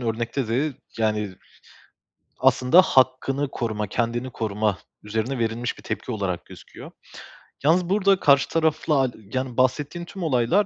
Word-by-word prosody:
örnekte 115 +1 -2
de, 135 +4 0 0.2
yani, 105 -3 0 1.0
aslında 130 +9 +5
hakkını 135 0 +2
koruma, 110 -3 -3
kendini 120 +5 -2
koruma 105 -3 -1 0.2
üzerine 110 +5 -2
verilmiş 115 +1 -2
bir - - -13
tepki 125 - -4
olarak 95 -5 -3
gözüküyor. - - -12 0.7
Yalnız 170 +4 +3
burada 195 -1 +3
karşı 140 -1 +4
tarafla, 155 -3 +1
aaa, 130 - +1 0.2
yani, 130 -1 -3
bahsettiğin 145 +6 0
tüm 190 +1 -8
olaylar 145 - +2
130 Hz, 130 wpm, -24 LUFS, 115-150 Hz, 1.0 s, aslında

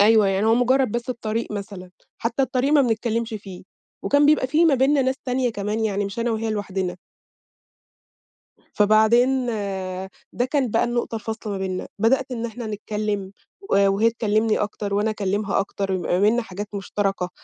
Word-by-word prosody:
أيوه 215 0 +6
يعني 195 +3 +1
هو 225 - +5
مجرّد 255 -1 +2
بس 240 +1 -2
الطريق 225 -2 -3
مثلًا، 195 -3 -7 0.3
حتّى 235 +4 0
الطريق 265 +2 0
ما 290 -2 +6
بنتكلمش 230 -1 -1
فيه، 195 -3 -8 0.4
وكان 285 0 +3
بيبقى 300 -3 +4
في 310 +5 +3
ما 305 -4 +5
بيننا 270 +2 +3
ناس 260 +1 0
تانية 250 -1 0
كمان 210 +2 -2
يعني، 205 -1 0
مش 200 +3 -6
أنا 235 0 0
وهي 225 0 -1
لوحدنا. 190 -4 -3 1.8
فبعدين 235 +5 +4 0.9
ده 245 - 0
كان 260 -3 0
بقى 230 - +2
النقطة 240 -1 -2
الفاصلة 220 -1 -4
ما 195 - -3
بيننا، 185 -1 -3
بدأت 255 +5 +2
إن 235 -1 -3
إحنا 230 0 -7
نتكلّم 210 -2 -3 0.4
و - - +3
وهي 215 +4 +3
تكلمني 220 -1 +1
أكتر 205 -1 -3
وأنا 210 +2 +1
أكلمها 200 -1 -1
أكتر، 195 -1 -2
ما 175 +1 0
بيننا 225 +4 +3
حاجات 205 -1 -7
مشتركة، 195 -2 -2
220 Hz, 165 wpm, -23 LUFS, 205-245 Hz, 1.8 s, أيوه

